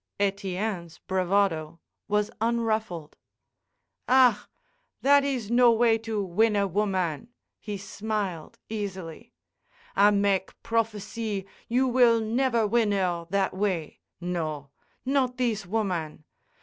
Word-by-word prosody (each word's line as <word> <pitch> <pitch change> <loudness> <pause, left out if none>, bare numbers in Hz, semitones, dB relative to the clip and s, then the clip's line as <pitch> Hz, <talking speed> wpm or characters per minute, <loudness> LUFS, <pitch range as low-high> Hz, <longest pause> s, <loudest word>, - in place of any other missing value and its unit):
Etienne's 195 -3 -2
bravado 180 -4 0 0.3
was 210 0 0
unruffled. 220 -8 -1 0.9
"Ah! 250 -5 +5 0.6
that 285 +1 +6
is 255 -6 -2
no 240 0 +6
way 225 0 +3
to 220 -2 -2
win 210 +4 +2
a 200 -1 +2
woman," 190 -3 -1 0.3
he 210 -2 -5
smiled, 200 -4 -4
easily. 190 -6 -6 0.6
"I 205 +1 +6
make 200 -2 0
prophecy 215 -2 -2 0.2
you 255 +3 +2
will 240 -2 +5
never 235 +1 +1
win 220 0 +2
'er 175 -3 -1
that 195 +1 0
way. 185 -6 -2 0.2
No. 155 -5 -4 0.3
Not 260 -2 +1
thees 220 -6 -1
woman. 180 -8 -2
205 Hz, 110 wpm, -27 LUFS, 185-230 Hz, 0.9 s, that